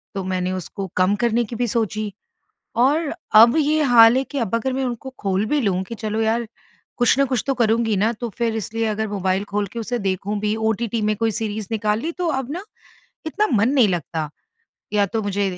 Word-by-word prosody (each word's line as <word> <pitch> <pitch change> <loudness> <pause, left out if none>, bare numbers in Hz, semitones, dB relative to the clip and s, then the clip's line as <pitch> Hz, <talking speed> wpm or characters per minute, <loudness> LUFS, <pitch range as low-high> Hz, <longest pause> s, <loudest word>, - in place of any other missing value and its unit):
तो 195 - -2
मैंने 185 0 -2
उसको 185 +1 -5
कम 185 +3 +3
करने 235 +1 +2
की 230 - -7
भी 245 +1 0
सोची 215 -2 -1 0.7
और 300 +2 +1 0.3
अब 235 +6 +6
ये 305 +1 +2
हाल 230 +2 +8
है 265 - +1
कि, 285 - -7
अब 230 -1 -1
अगर 255 +3 -1
मैं 265 0 -1
उनको 245 +2 -4
खोल 195 +1 0
भी 295 - +2
लूँ 190 -4 0
कि 230 +5 -7
चलो 215 +1 -2
यार, 225 +1 0 0.5
कुछ 245 +1 +3
न 275 - +5
कुछ 255 -4 -1
तो 270 - +2
करुँगी 225 -2 +1
ना, 220 +4 +2
तो 235 +1 -5
फिर 230 -2 0
इसलिए 225 +2 -2
अगर 220 0 -2
मोबाइल 190 -1 -1
खोल 205 -1 0
के 235 - -4
उसे 240 +2 -3
देखूँ 200 +3 -2
भी, 210 +1 0
ओटीटी 220 0 -1
में 210 0 +1
कोई 225 +1 0
सीरीज़ 215 -1 -3
निकाल 215 0 0
ली, 325 +6 -3
तो 355 0 -3
अब 265 +2 -8
ना 360 +5 -5 0.6
इतना 420 +7 0
मन 225 +5 +3
नहीं 260 -6 +4
लगता। 165 -4 -2 0.6
या 205 -1 +3
तो 220 +3 -2
मुझे 200 0 -1
220 Hz, 215 wpm, -21 LUFS, 205-240 Hz, 0.7 s, हाल